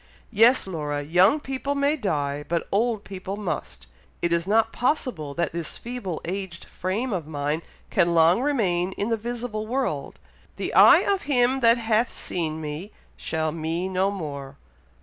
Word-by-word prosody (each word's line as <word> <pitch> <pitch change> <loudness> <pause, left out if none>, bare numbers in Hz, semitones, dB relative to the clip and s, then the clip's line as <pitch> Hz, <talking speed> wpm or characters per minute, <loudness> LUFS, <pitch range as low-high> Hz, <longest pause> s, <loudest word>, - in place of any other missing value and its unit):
"Yes, 230 +4 +5
Laura! 150 -5 -3
young 180 - +4
people 270 0 -3
may 285 +2 +2
die, 150 - -2
but 170 -1 -1
old 220 +1 +1
people 195 +1 -6
must. 105 - -4 0.4
It 170 0 +2
is 170 +1 0
not 225 +2 +3
possible 240 - -1
that 170 -2 -1
this 170 -2 -4
feeble 235 -9 -5
aged 185 -1 -5
frame 210 +7 -3
of 170 -5 -3
mine 150 +1 -2 0.3
can 170 -2 +2
long 165 +6 +5
remain 190 -10 +1
in 205 +3 -2
the 230 - +2
visible 230 -1 -4
world. 230 - -2 0.4
'The - - -4
eye - - +8
of 395 -2 0
him 260 -2 +3
that 230 -1 +5
hath 225 +1 +1
seen 160 -3 -3
me 155 +6 -6 0.2
shall 160 -1 -2
me 165 +3 -2
no 190 +1 +1
more.' 140 -7 -6
190 Hz, 160 wpm, -25 LUFS, 160-235 Hz, 0.4 s, eye